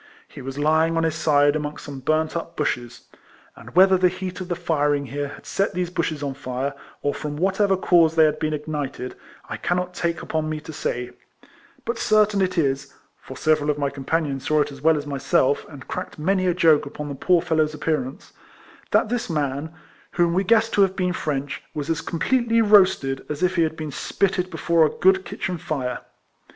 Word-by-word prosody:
He - - -11
was 135 +1 -6
lying 160 +2 +2
on 165 - +2
his 160 -1 +1
side 145 -2 +3
amongst 150 0 -4
some 140 -2 -7
burnt 155 +4 0
up 170 - -5
bushes; 120 -5 -2 0.5
and - - -13
whether 190 0 +6
the 180 - +5
heat 185 0 -6
of 185 - -5
the 175 - -2
firing 145 -3 0
here 145 +1 -3
had 140 - -12
set 195 -1 -1
these 180 -1 -2
bushes 165 -4 -2
on 140 -1 -2
fire, 130 +1 -4 0.3
or 145 - +1
from 150 -1 -5
whatever 195 +2 +2
cause 170 -3 +4
they 160 - +6
had 155 0 0
been 155 - -1
ignited, 145 -4 -4 0.3
I - - -5
cannot 180 +1 -1
take 170 -1 -2
upon 155 -1 -2
me 155 0 -3
to 160 - -9
say; 125 -3 -3 0.7
but 235 0 -2
certain 215 -2 +3
it 185 -1 0
is 140 -3 0 0.3
(for 130 - -10
several 155 -1 +2
of 150 - +1
my 140 -1 -1
companions 140 0 -2
saw 155 -1 +3
it 145 - -1
as 140 -1 -11
well 160 +1 +4
as 145 - -4
myself, 140 -1 +1
and 140 -3 -11
cracked 180 - -5
many 185 +4 +1
a 175 - +2
joke 160 -5 +4
upon 150 +1 -6
the 145 - -4
poor 175 +6 +3
fellow's 160 -3 0
appearance,) 145 -3 -3 0.6
that - - +3
this 240 -3 -2
man, 145 -1 -2 0.4
whom 175 -1 +2
we 190 +2 +2
guessed 225 +2 +3
to 205 - +3
have 190 -1 +3
been 180 -1 0
French, 145 -5 -3
was 150 +1 -2
as 160 - -1
completely 230 +7 +1
roasted 190 -11 +4
as 150 +3 -3
if 180 +1 +2
he 170 - +3
had 160 0 0
been 155 -2 -5
spitted 185 +5 -1
before 165 -1 +2
a 155 - +4
good 190 0 +4
kitchen 180 -3 -4
fire. 130 -6 -3
155 Hz, 205 wpm, -23 LUFS, 145-180 Hz, 0.7 s, whether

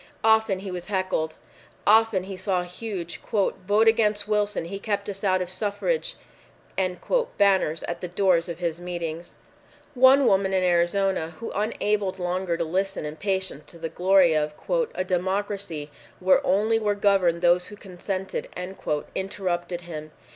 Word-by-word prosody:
Often 220 -3 +3
he 195 -1 -6
was 180 -1 -6
heckled. 185 -5 -1 0.5
Often 220 -3 +4
he 190 0 -6
saw 185 -1 -1
huge 180 -2 -6
"VOTE 205 +1 +2
AGAINST 215 -2 +3
WILSON! 210 -4 0
HE 195 +4 -6
KEPT 200 -1 -2
US 195 0 -9
OUT 185 -2 +2
OF 180 - -8
SUFFRAGE!" 215 - -1 1.2
banners 190 -6 +3
at 170 - -4
the 180 - -3
doors 180 -1 +2
of 170 - -4
his 170 -2 -2
meetings. 170 -1 -5 0.6
One 260 +1 +6
woman 195 -2 +3
in 185 -1 +2
Arizona, 175 -1 +1
who, 230 - -5
unable 210 -2 0
longer 180 -1 -1
to - - 0
listen 190 +1 -1
in 150 +1 -6
patience 190 -6 -2
to 170 - -13
the 165 -1 -4
glory 180 0 +4
of 150 0 0 0.4
"a 185 - 0
democracy 185 -4 -2 0.3
where 185 0 +4
only 215 +4 +2
were 210 -2 0
governed 190 -4 +2
those 175 +1 +4
who 205 - -9
consented," 190 0 -5 0.6
interrupted 180 -2 -3
him. 155 -3 -8
190 Hz, 145 wpm, -25 LUFS, 175-205 Hz, 1.2 s, One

